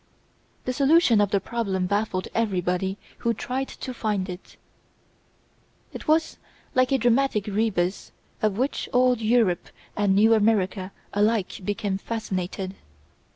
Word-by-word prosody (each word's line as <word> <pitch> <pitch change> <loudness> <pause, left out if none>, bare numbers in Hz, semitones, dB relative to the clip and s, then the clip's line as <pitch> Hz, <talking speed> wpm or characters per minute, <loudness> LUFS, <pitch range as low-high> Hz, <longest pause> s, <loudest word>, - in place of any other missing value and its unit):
The 255 - -1
solution 275 -4 +4
of 205 - +2
the 200 - +2
problem 195 -5 -2
baffled 200 -1 -1
everybody 190 -3 0 0.2
who 230 0 0
tried 260 +5 -3
to 255 - -7
find 210 -5 -2
it. 180 +1 -9 1.4
It - - -8
was 315 +1 +2 0.4
like 255 0 +3
a 270 - +4
dramatic 240 -3 +2
rebus 205 -3 -1 0.3
with 215 -2 +1
which 265 +4 -1
old 250 -1 +3
Europe 220 -6 +2 0.3
and 200 -2 +2
new 220 +3 +5
America 200 -3 +1 0.2
alike 210 -1 +1
became 205 -1 -2
fascinated. 190 -4 -4
210 Hz, 125 wpm, -25 LUFS, 190-240 Hz, 1.4 s, new